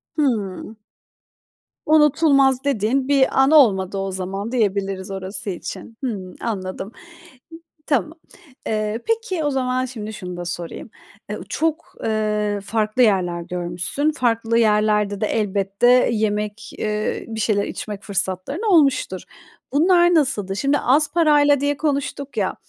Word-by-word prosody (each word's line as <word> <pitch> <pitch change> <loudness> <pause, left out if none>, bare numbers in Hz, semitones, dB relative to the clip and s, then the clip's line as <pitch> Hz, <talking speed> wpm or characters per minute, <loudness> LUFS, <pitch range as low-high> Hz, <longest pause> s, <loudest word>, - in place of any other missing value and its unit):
Hıı. 220 - -2 1.1
Unutulmaz 285 -3 +4
dediğin 260 0 0
bir 275 -2 +3
an 270 - +3
olmadı 200 -10 +4
o 195 0 -2
zaman 190 +4 -4
diyebiliriz 195 -4 -1
orası 195 +2 -4
için. 195 +4 -7
Hımm, 195 -8 -4
anladım. 195 -2 -4 1.0
Tamam. 305 +2 0 0.5
Eee, 215 +1 -2
peki 450 -7 -1
o 295 - +1
zaman 255 -1 0
şimdi 220 -4 -7
şunu 180 -4 -7
da 175 - -5
sorayım. 175 -1 -6 0.4
Eee, - - -4
çok, 320 +1 -2
eee, 210 -1 0
farklı 215 +3 0
yerler 185 -6 +2
görmüşsün, 180 - -2
farklı 230 -5 0
yerlerde 210 -2 +2
de - - +2
elbette 200 +1 0 0.2
yemek, 210 -1 -2
eee 210 0 -2
bir 225 -1 -6
şeyler 205 -2 +1
içmek 210 -1 -6
fırsatların 200 - -1
olmuştur. 275 - +3 0.5
Bunlar 345 +3 +4
nasıldı? 205 - +1
Şimdi 275 +6 +1
az 290 +5 +3
parayla 295 -4 +4
diye 285 +1 0
konuştuk 280 -3 -3
ya, 195 -3 0
220 Hz, 125 wpm, -21 LUFS, 195-280 Hz, 1.1 s, Unutulmaz